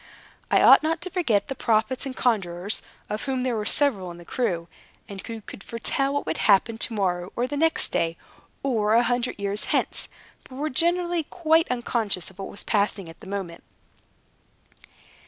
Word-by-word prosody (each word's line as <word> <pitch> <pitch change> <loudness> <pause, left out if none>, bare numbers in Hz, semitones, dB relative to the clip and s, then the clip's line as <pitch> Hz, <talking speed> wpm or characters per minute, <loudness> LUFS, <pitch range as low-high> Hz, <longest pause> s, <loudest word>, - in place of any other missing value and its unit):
I - - +4
ought - - +9
not 320 +1 0
to 370 0 -4
forget 235 - +1
the 270 - -3
prophets 235 +3 0
and 260 - -6
conjurors, 195 -4 0 0.3
of 210 +1 -4
whom 260 -2 -1
there 255 -2 0
were 210 -1 -2
several 225 -12 +2
in 170 - -9
the 175 - -13
crew, 175 -9 -1 0.4
and 195 -1 -8
who 225 -1 -6
could 195 - -10
foretell 270 +4 0
what 285 - -1
would - - -2
happen 220 +2 +3
to 230 - +1
morrow 180 -3 -1
or 240 - +1
the 275 +3 -4
next 320 +2 +2
day, 165 0 0 0.5
or 220 -5 +2
a 235 - +5
hundred 245 +1 0
years 200 0 -1
hence, - - -1 0.4
but 255 - -12
were 300 +3 -2
generally 345 +3 +1
quite 325 0 +2
unconscious 225 -7 -2
of 190 - -23
what 195 - -5
was 200 - -7
passing 200 -4 0
at 165 - -13
the 220 - -12
moment. 190 -4 -5
225 Hz, 185 wpm, -25 LUFS, 195-270 Hz, 0.5 s, ought